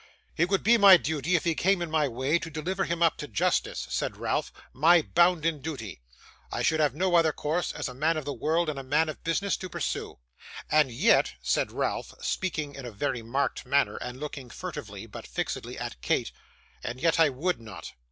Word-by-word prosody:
'It 170 +2 +2
would 195 -1 +1
be 235 +2 +5
my 195 -2 +10
duty, 160 +2 -1
if 165 - +1
he 170 - +1
came 190 +4 +2
in 170 -2 -4
my 155 -2 +2
way, 135 +6 0
to 165 - -6
deliver 180 +5 -2
him 170 0 0
up 165 - +3
to 150 - -6
justice,' 105 -6 0
said - - -2
Ralph, - - -1 0.2
'my 165 +5 +5
bounden 165 -3 +2
duty; 120 - -6 0.5
I - - -2
should 160 - +2
have 145 -4 +2
no 185 +2 0
other 165 -2 +5
course, 160 +4 -1
as - - -4
a - - -7
man 155 +5 +1
of 155 - -4
the 145 - -3
world 165 +4 0
and 150 -3 -3
a - - -6
man 150 +4 +2
of 155 - -8
business, 195 +4 0
to 185 - -7
pursue. - - -4 0.5
And 150 -4 +4
yet,' 115 - +3
said - - +1
Ralph, - - -3
speaking 155 -6 -2
in 135 -3 -8
a - - -7
very 120 +3 -2
marked 130 +5 -1
manner, 140 0 +1
and 125 +1 -6
looking 140 -4 -6
furtively, 115 - -7
but 115 - -10
fixedly, - - -4
at - - -6
Kate, - - 0 0.5
'and 125 - -5
yet 165 +2 +2
I 160 -2 +6
would 145 +3 -2
not. 110 -3 -9
155 Hz, 210 wpm, -28 LUFS, 135-170 Hz, 0.5 s, my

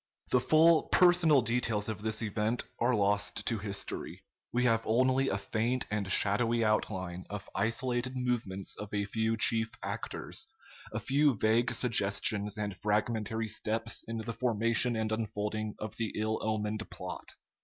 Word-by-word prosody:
The 125 - +4
full 160 +3 +5
personal 175 -7 +5
details 115 -3 0
of 110 -2 -4
this 110 +1 -2
event 110 +2 0 0.2
are 120 +1 +2
lost 105 0 0
to 115 -3 0
history. 100 -1 -5 0.3
We 125 +1 +1
have 115 -2 +3
only 130 +3 +2
a 100 - 0
faint 110 +6 0
and 100 -2 -1
shadowy 115 +4 +3
outline 95 -4 -1
of 105 -1 -6
isolated 120 +4 -1
movements 115 -7 -2
of 105 -1 -7
a 100 0 0
few 110 +2 -1
chief 110 0 +2
actors, 270 - -5 0.4
a 110 - -3
few 140 +4 +2
vague 115 +4 +2
suggestions 105 -2 +1
and 105 -2 -3
fragmentary 110 +2 -1
steps 110 +2 -1
in 115 0 -4
the 115 +1 -4
formation 115 0 +1
and 110 0 -1
unfolding 110 -1 -3
of 110 0 -6
the 115 -3 -2
ill 110 +1 -1
omened 110 0 -2
plot. - - -7
110 Hz, 150 wpm, -31 LUFS, 105-120 Hz, 0.4 s, full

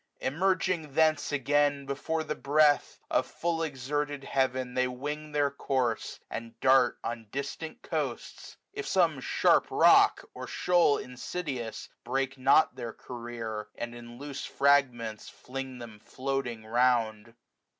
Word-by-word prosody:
Emerging 170 0 0
thence 155 -2 +3
again, 145 0 +1
before 155 +4 -2
the 155 - -3
breath 145 0 +3
170 - - +3
Of - - -3
full 170 -1 0
exerted 145 -1 -2
heaven 130 -2 0
they 130 0 +2
wing 150 +4 -5
their 145 -1 +1
course. 130 -5 -1
And 115 0 -7
dart 130 -1 +4
on 115 -1 -5
distant 140 +3 -5
coasts; - - -4 0.2
if 415 -1 -5
some 170 -7 +2
sharp - - +3
rock. - - +5
Or - - -7
shoal 175 -5 +3
insidious, 125 -2 -5 0.2
break 135 0 -1
not 135 +4 +4
their 120 -3 -6
career, 115 -3 -6
And 120 0 -5
in 120 0 -10
loose 140 +1 -6
fragments 125 -6 +1
fling 130 0 -7
them 115 -3 -10
floating 130 -2 -4
round. 115 -2 +1
135 Hz, 130 wpm, -29 LUFS, 120-145 Hz, 0.2 s, rock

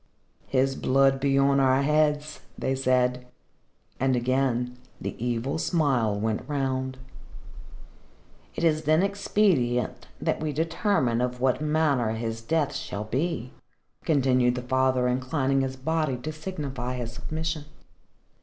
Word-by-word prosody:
"His 135 0 +1
blood 135 +1 +3
be 135 0 +2
on 140 0 +4
our 135 0 +3
heads," 150 0 +1 0.2
they 135 - -1
said. 125 -1 +1 0.7
And 130 0 +2
again, 125 0 0 0.2
the - - -4
evil 125 +5 -1
smile 130 - +1
went 110 0 -1
round. 130 -2 -1 1.6
"It - - -3
is 155 -1 +2
then 155 +4 +4
expedient 195 - +1
that - - -1
we 155 -1 -2
determine 160 - +1
of 125 0 -2
what 130 +2 +1
manner 150 -7 +1
his 115 0 -4
death 150 +5 0
shall 100 - -4
be," 130 +2 -2 0.5
continued 130 -5 +3
the 125 - -4
father, 130 0 +2
inclining 130 +2 +1
his 130 0 -2
body 155 0 -1
to 150 +6 -5
signify 145 -7 -5
his 120 -2 -5
submission. 155 +4 -4
135 Hz, 125 wpm, -26 LUFS, 125-150 Hz, 1.6 s, on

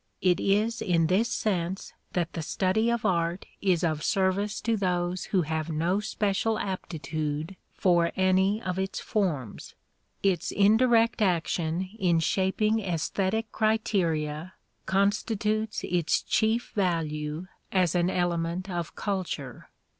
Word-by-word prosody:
It 180 -2 +4
is 215 +4 +1
in 170 -3 +2
this 200 +8 +2
sense 190 -4 -2 0.2
that 175 -2 -1
the 165 - -3
study 195 +8 +1
of 235 -1 -1
art 170 0 0 0.2
is 180 -4 +2
of 155 -3 0
service 195 +2 +1
to 230 0 +1
those 180 -2 -1
who 185 -3 +1
have 160 +1 -2
no 170 +5 +1
special 210 +1 0
aptitude 155 -3 -3 0.2
for 175 -2 +3
any 190 +2 +3
of 180 0 -2
its 190 0 -2
forms: 160 - -2 0.5
its 190 -5 +1
indirect 225 +3 +4
action 175 -1 0
in 175 -4 +3
shaping 190 +7 +1
æsthetic 195 +3 -1
criteria 180 -7 0 0.3
constitutes 215 +2 0
its 175 -2 +1
chief 225 +2 +1
value 160 -4 -1 0.3
as 185 -4 +2
an 175 0 +2
element 175 +1 -1
of 175 -2 -4
culture. 180 - -4
185 Hz, 125 wpm, -27 LUFS, 170-205 Hz, 0.5 s, It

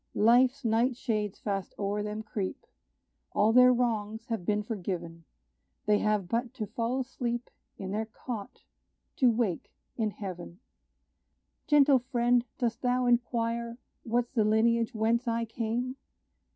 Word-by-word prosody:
Life's 250 +4 +4
night 230 +3 +2
shades 215 -5 -2
fast 195 -3 -3
o'er 205 +1 -1
them 210 +1 -4
creep; 210 -3 -4 0.7
All 215 +2 +3
their 250 +1 +8
wrongs 225 -3 -1
have 225 -7 -3
been 210 0 +1
forgiven 175 -6 -5 0.6
They 210 0 +3
have 210 -3 +1
but 235 +5 -2
to 220 -5 -3
fall 230 +4 -2
asleep 245 -2 -3 0.3
In 190 -1 -5
their 220 +2 -2
cot, 230 +1 -7 0.5
to 255 - +5
wake 225 -6 -1 0.3
in 220 -3 +1
heaven. 185 -3 -7 1.1
Gentle 285 -3 +6
friend, 245 -1 +2
dost 235 -2 -1
thou 250 0 +1
inquire 235 -1 0 0.2
What's 240 +1 -1
the 220 - +2
lineage 230 +3 +2
whence 230 +3 +1
I 230 0 0
came? 235 +3 -3
230 Hz, 135 wpm, -29 LUFS, 210-245 Hz, 1.1 s, their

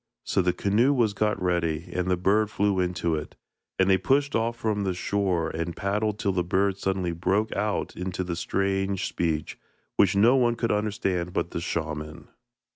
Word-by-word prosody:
So - - +1
the 90 0 +2
canoe 110 +10 +2
was 115 -6 +2
got 105 +2 0
ready, 85 -2 0
and 90 0 -1
the 90 - +2
bird 105 +4 +2
flew 100 -2 +1
into 90 -2 0
it, 75 -1 -4 0.4
and 95 - +3
they 95 -1 +4
pushed 140 +8 +1
off 115 +1 0
from 110 -4 -1
the 95 -2 -1
shore, 90 -3 0
and 85 +1 -3
paddled 105 +2 -1
till 100 -3 0
the 90 -1 0
bird 95 +2 +1
suddenly 95 -3 -1
broke 95 +6 0
out 105 +1 -1
into 95 0 -3
the 90 -2 -3
strange 95 +1 -1
speech, 80 -3 -2 0.4
which 100 -1 +4
no 115 +6 +5
one 120 -3 +3
could 115 0 -1
understand 95 -4 -1
but 85 -2 -1
the 85 - -3
shaman. 75 -2 -4
95 Hz, 185 wpm, -26 LUFS, 90-105 Hz, 0.4 s, no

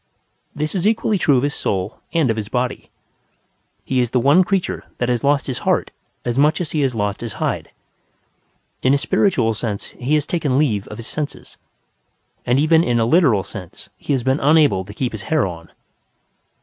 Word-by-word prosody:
This 150 +1 -2
is 190 0 0
equally 215 -2 +1
true 145 -5 +4
of 125 - +1
his 145 +1 0
soul 95 +2 -2
and 160 -8 +2
of - - -1
his 110 -1 -5
body; 125 0 -2 1.0
he 130 - 0
is 120 -2 +1
the 125 - +1
one 145 +9 +5
creature 190 0 -1
that 120 - -1
has 120 0 0
lost 140 0 +2
his 130 -3 -3
heart - - 0 0.3
as 120 +2 0
much 150 +2 +3
as 175 -4 -3
he 155 - 0
has 130 -3 0
lost 105 -1 -2
his 115 -3 -5
hide. - - -3 1.1
In 130 +2 +4
a - - +3
spiritual 130 - +1
sense 105 -2 -5
he 135 +5 +1
has 150 -2 +1
taken 150 -7 0
leave 110 -10 +1
of 105 - -8
his 115 - -8
senses; 150 +3 -6 0.9
and 120 +2 +3
even 160 +3 +4
in 120 -5 +1
a 115 - +2
literal 125 - +3
sense 95 -3 -10
he - - -6
has 130 -3 0
been 130 +3 +1
unable 145 -10 +4
to 105 - -10
keep 125 0 -2
his 110 - -6
hair 155 -4 +2
on. 85 -3 -8
130 Hz, 200 wpm, -20 LUFS, 115-150 Hz, 1.1 s, one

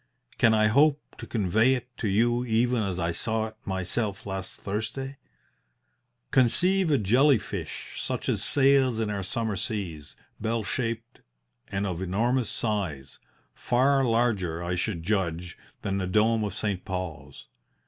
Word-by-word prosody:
Can 110 -1 +5
I 110 0 +4
hope 140 +6 +4 0.2
to - - -7
convey 110 +4 +3
it 125 0 -8
to 115 - -2
you 120 +4 +2
even 120 0 +2
as 95 -4 -2
I 85 -2 0
saw 110 +6 -1
it 110 - -20
myself 95 +2 -2
last 95 -1 -5
Thursday? 130 +7 -4 1.1
"Conceive 175 +8 +3
a 145 - +4
jelly 125 +6 +4
fish - - -6
such - - -3
as - - 0
sails 135 -4 +4
in 110 -2 -1
our 100 -1 -2
summer 110 +3 -2
seas, 90 -7 -4 0.2
bell 115 +1 -1
shaped 115 +2 -3 0.5
and 100 +1 -2
of 90 -2 -3
enormous 115 +6 0
size 90 - -3 0.3
far 135 +3 +2
larger, 110 -9 +1
I 85 +1 -2
should 90 -2 -2
judge, 90 -3 -1 0.3
than 100 0 -1
the 95 - -2
dome 110 +3 +3
of 100 -3 -3
St. 100 -4 -2
Paul's. 80 -6 -6
110 Hz, 150 wpm, -27 LUFS, 95-120 Hz, 1.1 s, Can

